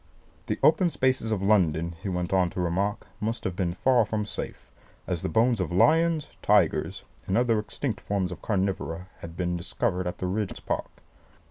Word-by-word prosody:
The -, -, -1 dB
open 185 Hz, -4 st, +5 dB
spaces 130 Hz, -5 st, 0 dB
of 100 Hz, -3 st, 0 dB
London, 85 Hz, -5 st, +2 dB
he 100 Hz, -, -3 dB
went 90 Hz, 0 st, -2 dB
on 90 Hz, -2 st, +3 dB
to 90 Hz, -, -6 dB
remark, 95 Hz, +5 st, -1 dB
must 115 Hz, +2 st, -2 dB
have 95 Hz, -, -2 dB
been 90 Hz, -2 st, -1 dB
far 125 Hz, +3 st, +4 dB
from 105 Hz, -1 st, -2 dB
safe, -, -, -7 dB, 0.3 s
as 85 Hz, -3 st, -2 dB
the -, -, -2 dB
bones 115 Hz, +6 st, +3 dB
of 90 Hz, -, -2 dB
lions, 160 Hz, -, +3 dB
tigers, 100 Hz, -6 st, +2 dB, 0.2 s
and 95 Hz, -, +1 dB
other 120 Hz, -3 st, +3 dB
extinct 110 Hz, +1 st, -4 dB
forms 95 Hz, -2 st, -1 dB
of 90 Hz, -, -7 dB
carnivora 95 Hz, -3 st, -2 dB
had 85 Hz, 0 st, -9 dB
been 90 Hz, -1 st, -1 dB
discovered 90 Hz, +1 st, -1 dB
in 90 Hz, -, -2 dB
the -, -, -3 dB
Regent's 100 Hz, +2 st, -2 dB
Park. -, -, -2 dB
95 Hz, 185 wpm, -27 LUFS, 90-110 Hz, 0.3 s, open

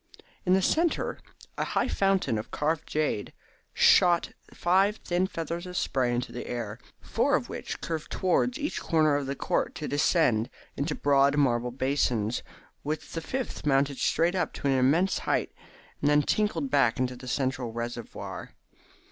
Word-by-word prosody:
In 180 Hz, -, +5 dB
the 190 Hz, -, +2 dB
centre 330 Hz, -, +1 dB, 0.4 s
a -, -, +2 dB
high -, -, 0 dB
fountain 195 Hz, -, +1 dB
of 110 Hz, -, -7 dB
carved 155 Hz, +1 st, -1 dB
jade 150 Hz, -9 st, -1 dB, 0.4 s
shot 175 Hz, -2 st, +4 dB, 0.2 s
five 190 Hz, +4 st, +2 dB
thin 180 Hz, -2 st, -1 dB
feathers 170 Hz, 0 st, -4 dB
of 180 Hz, 0 st, -5 dB
spray 125 Hz, -2 st, +1 dB
into 120 Hz, 0 st, -2 dB
the 120 Hz, -, -6 dB
air, 120 Hz, -1 st, -4 dB, 0.2 s
four -, -, +1 dB
of -, -, -2 dB
which -, -, -5 dB
curved 160 Hz, -2 st, -4 dB
towards 215 Hz, +8 st, +1 dB
each 300 Hz, 0 st, -3 dB
corner 155 Hz, -3 st, +3 dB
of 145 Hz, -1 st, -1 dB
the 140 Hz, -, -2 dB
court -, -, -1 dB
to 150 Hz, -, -4 dB
descend 145 Hz, -6 st, +2 dB, 0.3 s
into 150 Hz, +2 st, -2 dB
broad 140 Hz, 0 st, +3 dB
marble 125 Hz, -4 st, +2 dB
basins, 125 Hz, -4 st, 0 dB, 0.4 s
while 150 Hz, +2 st, -2 dB, 0.2 s
the 165 Hz, -, -3 dB
fifth 255 Hz, +9 st, -4 dB
mounted 140 Hz, -1 st, +1 dB
straight 170 Hz, +2 st, +2 dB
up 185 Hz, -, -1 dB
to -, -, -8 dB
an 140 Hz, -, +3 dB
immense 145 Hz, +9 st, +3 dB
height, -, -, -1 dB, 0.5 s
and 145 Hz, -, +3 dB
then 150 Hz, 0 st, +4 dB
tinkled 165 Hz, -7 st, 0 dB
back 130 Hz, -5 st, +3 dB
into 125 Hz, 0 st, -1 dB
the 125 Hz, +1 st, -11 dB
central 130 Hz, -2 st, -1 dB
reservoir. 120 Hz, 0 st, -6 dB
145 Hz, 165 wpm, -28 LUFS, 130-175 Hz, 0.5 s, In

